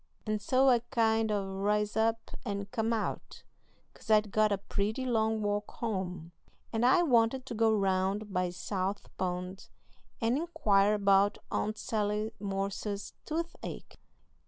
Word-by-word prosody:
And 215 -1 -1
so 260 +5 +3
I 245 -2 +6
kind 225 -1 +2
o' 205 -2 0
ris 210 +1 +1
up 225 +1 0
and 200 -2 -4
come 225 -2 0
out, 225 -2 -3 0.5
'cause - - -16
I'd 215 -1 +4
got 215 0 +3
a 200 - +2
pretty 205 +5 -2
long 220 -3 +1
walk 205 0 -1
home, 185 -7 -4 0.4
and 225 +1 0
I 265 +8 +5
wanted 250 -2 +3
to 265 - -6
go 225 0 +3
round 195 0 0
by 180 -1 +1
South 190 +2 -4
Pond 180 +1 -3 0.5
and 235 +2 +1
inquire 210 -11 +3
about 200 0 +3
Aunt 215 +1 -1
Sally 210 0 -1
Morse's 200 +1 -3
toothache."... 330 +2 -5
210 Hz, 140 wpm, -31 LUFS, 200-225 Hz, 0.5 s, I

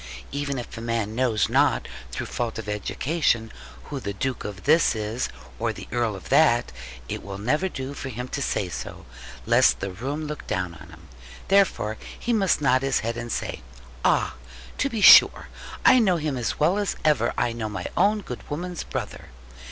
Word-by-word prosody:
Even 140 -1 -2
if 120 - -7
a 115 - -7
man 115 -2 -2
knows 115 -3 +1
not, - - +2 0.2
through - - -4
fault 120 -2 -3
of 110 -2 -6
education, 115 +2 0 0.3
who 145 - -6
the 100 -5 -4
Duke 130 +5 -3
of 100 -1 -7
this 155 -2 +4
is, 110 +3 -2 0.3
or - - 0
the - - -9
Earl 115 -2 0
of 95 - -11
that, 120 -7 +4 0.4
it - - -4
will 100 -1 -7
never 150 - 0
do 135 -3 -5
for 135 - -6
him 125 +1 -5
to 140 - -3
say 100 - -1
so, 90 - -7 0.4
lest - - +4
the 100 - -4
room 135 +11 -4
look 150 0 -6
down 90 -4 -2
on 85 - -13
him. 80 0 -15 0.4
Therefore 190 - +2 0.2
he 240 - -1
must 195 -8 +2
nod 130 -2 +3
his 135 -1 +1
head, 115 +1 -2
and 120 0 -5
say, - - -3 0.4
'Ah, - - +2 0.5
to 275 - +1
be 225 -5 -3
sure! - - +8 0.4
I 255 - +8
know 190 -6 +3
him 150 -3 -2
as 120 -2 -2
well 175 +7 +3
as 205 - -1
ever 140 -7 +3
I 120 - +1
know 110 -2 -4
my 105 - -5
own 205 +3 +3
good 125 -10 -7
woman's 175 +3 -4
brother. - - -6
125 Hz, 190 wpm, -25 LUFS, 110-155 Hz, 0.5 s, sure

